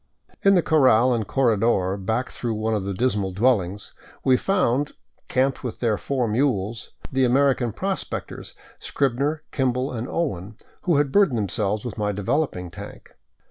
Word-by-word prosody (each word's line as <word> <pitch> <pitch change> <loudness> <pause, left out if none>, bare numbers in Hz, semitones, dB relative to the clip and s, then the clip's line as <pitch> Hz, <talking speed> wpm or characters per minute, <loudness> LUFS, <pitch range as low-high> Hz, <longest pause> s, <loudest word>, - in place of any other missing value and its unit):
In 195 0 +5
the 175 - +3
corral 130 -5 +4
and 110 -4 -1
corredor 115 -7 +2
back 110 +6 -2
through 115 -2 -3
one 110 +1 -1
of 105 -3 -1
the 100 - -2
dismal 100 -4 0
dwellings 100 -3 0 0.3
we 130 - +5
found, 145 -5 +1 0.3
camped 130 +1 0
with 125 - -5
their 115 -3 +1
four 125 +2 -1
mules, 115 -2 -1 0.2
the 130 0 +2
American 130 -1 +3
prospectors, 190 - -5 0.2
Scrib 135 -3 -1
ner, 150 +3 -1
Kimball, 130 0 0
and 120 0 -4
Owen, 110 - -3 0.3
who 175 -4 +3
had 140 -1 +2
burdened 195 -10 +4
themselves 105 +1 -1
with 115 -2 -5
my 105 -1 0
developing 100 - -1
tank. - - -10
120 Hz, 155 wpm, -23 LUFS, 105-135 Hz, 0.3 s, In